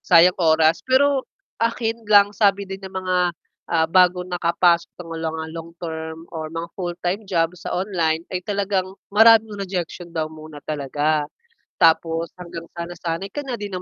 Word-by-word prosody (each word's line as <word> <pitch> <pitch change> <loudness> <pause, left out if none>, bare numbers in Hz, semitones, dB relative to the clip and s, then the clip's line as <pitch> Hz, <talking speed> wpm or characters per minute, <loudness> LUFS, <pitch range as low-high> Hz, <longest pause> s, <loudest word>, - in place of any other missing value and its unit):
sayang 180 +1 +5
oras 160 -1 +4
pero 270 +1 +2 0.3
akin 230 -1 -1
lang 205 -1 +6
sabi 200 -1 +2
din 195 0 -7
ng 190 -1 -9
mga, 185 -1 -1 0.5
ah 160 -1 +1
bagong 180 +1 +3
nakapasok 170 -1 +2
ng 165 - -8 0.2
mga 160 0 -3
long-term 165 -1 -7
or 160 -1 -6
mga 165 +1 -4
full-time 180 +2 -3
job 170 -4 +1
sa 175 - -6
online 170 -4 0
ay 180 -1 -4
talagang 195 -2 -1 0.2
maraming 220 0 +6
rejection 180 -3 -5
daw 160 -2 -2
muna 155 -1 -11
talaga. 150 +1 0 0.5
Tapos 165 0 +2
hanggang 170 -1 -7
sa 170 0 -6
nasanay 175 +1 -4
ka 290 +9 -5
na 250 -3 -4
'di 205 - -4
na 190 - -6
175 Hz, 155 wpm, -22 LUFS, 165-200 Hz, 0.5 s, lang